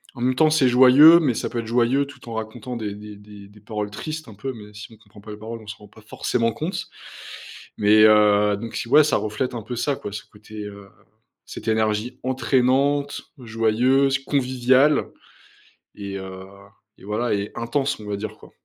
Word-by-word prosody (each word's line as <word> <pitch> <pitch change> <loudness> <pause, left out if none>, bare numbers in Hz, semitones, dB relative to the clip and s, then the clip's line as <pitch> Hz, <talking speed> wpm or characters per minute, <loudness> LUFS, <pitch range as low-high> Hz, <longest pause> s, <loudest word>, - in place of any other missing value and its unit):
En 120 - -9
même 130 +1 +2
temps, 155 +4 +4
c'est 155 -4 +3
joyeux, 130 +7 +8
mais 140 -8 0
ça - - -3
peut 120 - -3
être 115 - -5
joyeux, 120 +4 +2
tout 140 - -15
en - - -6
racontant 110 +2 -6
des 105 -3 -5
des 105 0 -10
des 105 0 -14
des 105 +1 -18
paroles 105 -1 -5
tristes 155 +9 -6
un 110 - -11
peu, 130 +6 -5
mais 105 -2 -13
si 105 +2 -11
on 110 - -16
comprend 105 -1 -18
pas 105 +1 -11
les 105 - -8
paroles, 115 +2 -8
on 110 - -16
se 110 - -7
rend 105 - -16
pas 110 +2 -18
forcément 115 +2 -1
compte. 160 - -5 0.9
Mais, 105 +1 +4
heu, 105 -1 +4
donc, 115 +2 -8
si, - - -4
ouais, 150 +4 +7
ça 150 - +1
reflète 110 +5 -3
un 115 - -4
peu 125 +3 -6
ça, 140 +4 -1
quoi, 105 - -8
ce 105 -1 -6
côté, 105 0 -11
heu, 100 -1 -11 0.6
cette - - -10
énergie 110 +3 -1
entraînante, 135 +2 +1 0.2
joyeuse, 125 +4 +1
conviviale 130 +1 +2 0.9
et 100 -1 -7
heu 95 0 -9 0.5
et - - -17
voilà 110 +4 -2
et 100 0 -3
intense, 135 +4 -2
on - - -10
va 100 - -2
dire, 110 +1 -6
quoi. - - -16
115 Hz, 205 wpm, -22 LUFS, 105-130 Hz, 0.9 s, joyeux